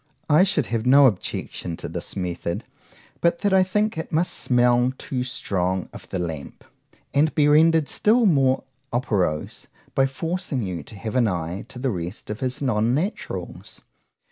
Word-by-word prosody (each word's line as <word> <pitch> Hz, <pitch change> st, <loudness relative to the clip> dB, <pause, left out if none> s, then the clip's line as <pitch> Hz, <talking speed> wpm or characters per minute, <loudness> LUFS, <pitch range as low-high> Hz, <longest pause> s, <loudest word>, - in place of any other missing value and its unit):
I 150 Hz, +4 st, +7 dB
should 180 Hz, -, +2 dB
have 115 Hz, -1 st, 0 dB
no 135 Hz, +3 st, +7 dB
objection 90 Hz, -5 st, -2 dB
to -, -, -6 dB
this -, -, -5 dB
method, 90 Hz, -2 st, -3 dB, 0.6 s
but 170 Hz, 0 st, +1 dB
that 200 Hz, -1 st, +2 dB
I 190 Hz, -, +6 dB
think 210 Hz, 0 st, 0 dB
it -, -, -6 dB
must 165 Hz, +3 st, +1 dB
smell 125 Hz, 0 st, +3 dB
too 130 Hz, -2 st, -3 dB
strong 95 Hz, -7 st, -2 dB
of -, -, -11 dB
the -, -, -3 dB
lamp,—and 90 Hz, -, -4 dB
be 150 Hz, -2 st, +4 dB
render'd 160 Hz, +1 st, +5 dB
still 230 Hz, +3 st, +3 dB
more 135 Hz, -8 st, +3 dB, 0.3 s
operose, 100 Hz, -, -1 dB, 0.3 s
by 135 Hz, 0 st, +3 dB
forcing 160 Hz, -, -3 dB
you 90 Hz, -3 st, -4 dB
to -, -, -13 dB
have 110 Hz, +3 st, -5 dB
an 125 Hz, -3 st, +4 dB
eye 90 Hz, 0 st, -3 dB
to 130 Hz, -, -12 dB
the 130 Hz, +1 st, -1 dB
rest 90 Hz, +2 st, -5 dB
of 105 Hz, -, -5 dB
his 130 Hz, +1 st, -3 dB
_Non 115 Hz, -3 st, +1 dB
naturals. 185 Hz, +9 st, -4 dB
125 Hz, 165 wpm, -23 LUFS, 100-155 Hz, 0.6 s, I